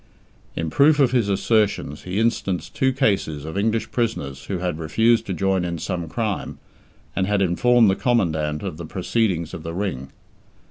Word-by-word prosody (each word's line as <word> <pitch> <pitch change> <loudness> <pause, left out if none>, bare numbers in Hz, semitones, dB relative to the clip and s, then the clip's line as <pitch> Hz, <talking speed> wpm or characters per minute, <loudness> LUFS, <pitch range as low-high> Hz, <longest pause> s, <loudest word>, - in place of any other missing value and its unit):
In 80 -1 -3
proof 145 - +5
of 135 -3 +4
his 120 -5 +1
assertions 100 -7 0
he 90 +2 -3
instanced 100 -7 -1
two 130 0 +2
cases 100 - 0
of 80 - -6
English 110 +2 0
prisoners 70 - -2
who 95 - -3
had 90 -2 -3
refused 110 +9 +2
to 95 - -2
join 95 0 +1
in 85 -1 -3
some 85 0 -4
crime, 105 +3 -3 0.6
and 95 -1 0
had 105 -1 +1
informed 115 +6 +4
the 95 - +3
Commandant 80 - 0
of 90 -6 -4
the 85 - -7
proceedings 95 -3 -1
of 85 - -6
the 85 +1 -6
Ring. 85 -9 -3
95 Hz, 175 wpm, -22 LUFS, 80-115 Hz, 0.6 s, proof